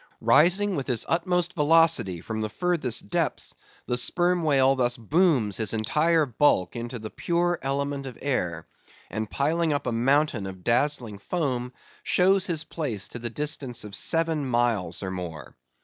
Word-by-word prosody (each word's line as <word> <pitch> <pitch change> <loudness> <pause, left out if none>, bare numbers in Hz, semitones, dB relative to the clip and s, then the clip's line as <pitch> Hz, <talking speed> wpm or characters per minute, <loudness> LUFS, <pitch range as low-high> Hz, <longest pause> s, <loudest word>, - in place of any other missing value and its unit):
Rising 190 +5 +3
with 135 - -3
his 125 -4 +1
utmost 180 +1 0
velocity 160 - +3
from 110 +3 -4
the 110 - -2
furthest 160 -4 0
depths, 170 -6 -1 0.3
the 125 - -1
Sperm 175 +7 +2
Whale 135 -4 +3
thus 125 -2 0
booms 125 - +2
his 110 -1 -1
entire 155 +8 +2
bulk 125 -7 +1
into 120 +1 -5
the 110 -1 -8
pure 175 0 0
element 140 0 -2
of 125 - -9
air, 90 - -2 0.5
and 110 +1 -3
piling 160 +5 0
up 145 - -1
a 125 - -1
mountain 125 -2 +1
of 95 -1 -9
dazzling 120 -3 0
foam, 125 - -2 0.3
shows 190 +1 +2
his 165 -4 -1
place 125 - -4
to 120 - -6
the 120 0 -4
distance 135 -2 -2
of 105 -1 -9
seven 160 +5 +1
miles 120 -9 0
and 95 -1 -4
more. 85 -5 -7
135 Hz, 160 wpm, -26 LUFS, 110-165 Hz, 0.5 s, Rising